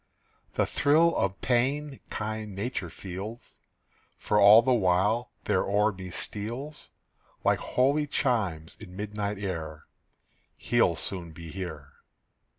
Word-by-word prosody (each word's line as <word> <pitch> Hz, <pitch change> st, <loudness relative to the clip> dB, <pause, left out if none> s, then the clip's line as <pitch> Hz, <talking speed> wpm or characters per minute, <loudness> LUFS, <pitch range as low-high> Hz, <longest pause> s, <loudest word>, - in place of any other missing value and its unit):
The -, -, +2 dB
thrill 160 Hz, +4 st, +3 dB
of 95 Hz, 0 st, -1 dB
pain 135 Hz, +3 st, 0 dB
kind 110 Hz, -1 st, -4 dB
Nature 100 Hz, -3 st, -3 dB
feels; 95 Hz, +7 st, -8 dB, 0.6 s
For 105 Hz, -, +1 dB
all 105 Hz, +3 st, +9 dB
the 130 Hz, +1 st, +3 dB
while 105 Hz, +3 st, +2 dB
there -, -, +2 dB
o'er 105 Hz, +2 st, +2 dB
me 95 Hz, -2 st, -8 dB
steals 120 Hz, -, -4 dB, 0.5 s
Like -, -, +3 dB
holy 140 Hz, +4 st, +1 dB
chimes 100 Hz, -, -1 dB
in 90 Hz, -3 st, -11 dB
midnight 105 Hz, 0 st, -3 dB
air, 80 Hz, -6 st, -5 dB, 0.7 s
"He'll -, -, +2 dB
soon 85 Hz, -4 st, -4 dB
be 85 Hz, -1 st, -9 dB
here." 95 Hz, -2 st, -6 dB
105 Hz, 120 wpm, -28 LUFS, 95-120 Hz, 0.7 s, all